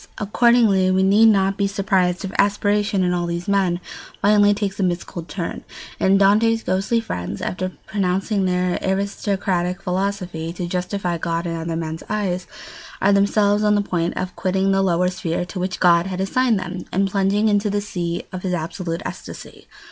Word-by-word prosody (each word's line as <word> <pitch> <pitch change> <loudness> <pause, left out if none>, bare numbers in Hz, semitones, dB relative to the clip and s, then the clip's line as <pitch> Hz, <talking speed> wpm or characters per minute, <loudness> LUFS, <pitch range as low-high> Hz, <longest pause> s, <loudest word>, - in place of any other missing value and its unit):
Accordingly 210 -3 +3
we 190 0 +2
need 205 +4 +5
not 195 -2 +3
be 200 - +1
surprised 195 -2 0
if 190 - -5
aspiration, 205 -1 +2
in 180 0 +1
all 175 -1 -1
these 170 +1 -4
men, 190 -3 +1 0.4
finally 205 0 +4
takes 205 -1 -2
a - - 0
mystical 175 -1 -2
turn; 170 +1 -5 0.4
and 195 +1 +4
Dante's 220 +3 +3
ghostly 195 +5 0
friends, 90 - -5
after 185 0 -3
propounding 195 0 0
their 180 0 0
aristocratic 190 -2 -1
philosophy, 180 -3 -3
to 180 0 -4
justify 180 0 -2
God 165 +1 -2
in 165 -1 -2
other 165 0 -3
men's 160 0 -4
eyes, 190 -4 -2 0.5
are 200 +1 +3
themselves 205 +1 +3
on 210 0 +3
the 205 - +2
point 175 -3 -2
of 185 -1 -4
quitting 190 +1 0
the 195 0 +2
lower 180 -1 +2
sphere 180 -2 -3
to 185 +1 -7
which 185 0 -3
God 175 0 +4
had 185 -1 -4
assigned 230 +4 +1
them 180 -1 -5
and 195 +1 0
plunging 200 +2 +2
into 205 0 +2
the 205 +1 0
"sea" 175 -4 -3
of 185 - -6
his 180 -1 -1
absolute 170 +2 -4
ecstasy. - - -9
190 Hz, 175 wpm, -21 LUFS, 180-200 Hz, 0.5 s, need